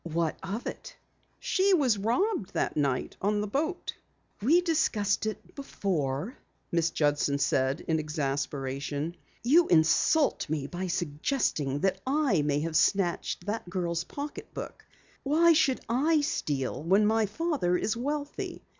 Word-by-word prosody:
"What 165 -1 -1
of 200 +5 -5
it?" - - -7 0.4
"She 385 0 +3
was 255 - +2
robbed 240 - 0
that - - 0
night 140 -4 0
on 210 +2 +1
the 210 - -1
boat." 310 - -2 0.5
"We 315 - +4
discussed 220 - +1
it 215 - -6
before," 185 - -2 0.4
Miss 170 -1 +2
Judson 145 -2 +1
said 135 +1 +1
in 160 -1 0
exasperation. 145 0 -3 0.3
"You 315 +8 +5
insult 170 - +3
me 150 -3 -1
by 180 +6 -4
suggesting 150 - -1
that 190 0 0
I 275 - +2
may 145 0 0
have 160 0 -3
snatched 175 -1 +1
the 210 +3 -2
girl's 170 -2 -1
pocketbook! 290 +1 -7 0.4
Why 330 +4 +4
should 270 -4 +2
I 295 +7 +2
steal 145 - -2
when 195 +6 +3
my 220 0 +2
father 215 - 0
is 220 - -1
wealthy? 285 +4 -4
195 Hz, 135 wpm, -28 LUFS, -, 0.5 s, You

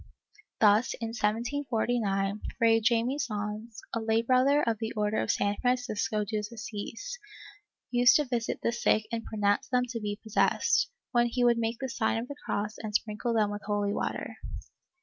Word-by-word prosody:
Thus, 215 +3 +4
in 230 -1 -3
1749, 225 -3 0 0.2
Fray 225 -1 +4
Jaime 235 +5 +2
Sans, 215 -2 -4
a 230 - 0
lay 225 0 +1
brother 260 +4 +4
of 225 -3 0
the 225 0 -3
Order 210 0 0
of 110 - -3
San 205 0 +1
Francisco 245 -4 0
de 215 +1 -2
Assis, 220 - -6 0.7
used 245 0 +6
to 300 - +4
visit 240 -3 -2
the - - +2
sick 235 -2 +2
and 230 -1 -2
pronounce 205 -2 0
them 250 -1 +2
to 230 -1 -3
be 205 -1 -4
possessed, 220 0 +2 0.2
when 240 0 +3
he 245 +1 0
would 240 -1 +4
make 225 0 -1
the 265 - -2
sign 225 -2 0
of 230 +2 -3
the 285 - -7
cross 210 +1 -3
and 210 -2 -5
sprinkle 225 +2 -1
them 210 -2 +2
with 205 0 -5
holy 205 -1 0
water. - - -3
225 Hz, 170 wpm, -29 LUFS, 210-240 Hz, 0.7 s, used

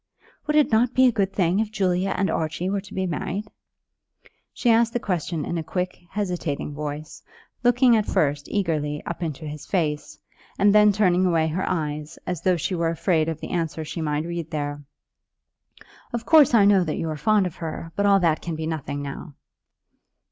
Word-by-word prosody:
"Would 300 - +1
it 300 -4 +4
not 235 +3 +2
be 260 - +6
a 250 - +5
good 200 -4 0
thing 185 0 +1
if 220 -1 0
Julia 190 -2 0
and 195 - +1
Archie 165 +3 -2
were 200 -1 -1
to 200 0 -13
be 190 0 0
married?" 185 +4 -3 1.1
She 240 - +1
asked 230 0 +3
the 240 - 0
question 170 -6 -2
in 170 - -2
a - - -4
quick, 180 +3 -3
hesitating 180 -8 -3
voice, 150 +1 -6 0.4
looking 245 0 +5
at 215 -2 +1
first 145 -1 0
eagerly 155 -7 -1
up 170 - -5
into 160 -2 -4
his 150 -1 -7
face, 150 -6 -2 0.4
and 200 +1 +4
then 210 0 +6
turning 185 -3 +2
away 165 -2 +2
her 175 +4 -2
eyes, 150 -2 -3
as 180 -4 -3
though 185 -1 +2
she 170 - -2
were 170 -2 0
afraid 165 -1 +1
of 160 -1 -5
the - - -6
answer 165 -2 -2
she 165 - -5
might 150 0 -1
read 170 -2 -4
there. 145 -1 -3 1.3
"Of 235 -1 -4
course 300 -6 +6
I 205 -3 +6
know 200 -2 +5
that 155 -3 -3
you - - -2
were 155 -1 -3
fond 210 +5 +2
of 180 - -5
her, 165 0 -6
but 205 0 +2
all 200 -1 +5
that 165 -3 +2
can 170 -2 -4
be 160 0 -4
nothing 145 -3 -4
now." 140 +1 -7
175 Hz, 200 wpm, -24 LUFS, 155-200 Hz, 1.3 s, be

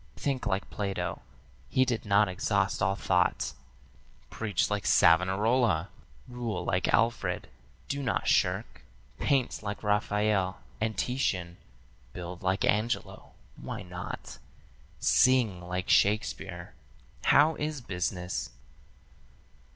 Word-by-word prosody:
Think 135 -3 -2
like 95 +1 -1
Plato, 100 -2 -3 0.5
he 130 - +3
did 120 -3 -2
not 100 +1 +4
exhaust 95 +1 0
all 100 -2 +2
thought; 90 -2 +1 0.8
Preach 105 -2 -1
like 105 -1 -1
Savonarola; 95 +2 +3 0.4
rule 115 -7 -4
like 90 - +1
Alfred; 115 +2 +1 0.4
do 140 0 -2
not 125 -4 -1
shirk; - - +1 0.4
Paint 135 -4 +1
like 105 0 -5
Raphael 105 -2 +1 0.2
and 110 0 -1
Titian; 95 -9 -1 0.6
build 90 0 -7
like 95 0 +1
Angelo 110 +4 -1 0.2
why - - -6
not? 90 -7 -7 0.6
Sing 115 - +3
like 90 +1 -4
Shakespeare. 105 +2 +1 0.5
'How 150 +3 +6
is 150 -1 -3
business?' 90 - -3
105 Hz, 105 wpm, -29 LUFS, 90-115 Hz, 0.8 s, How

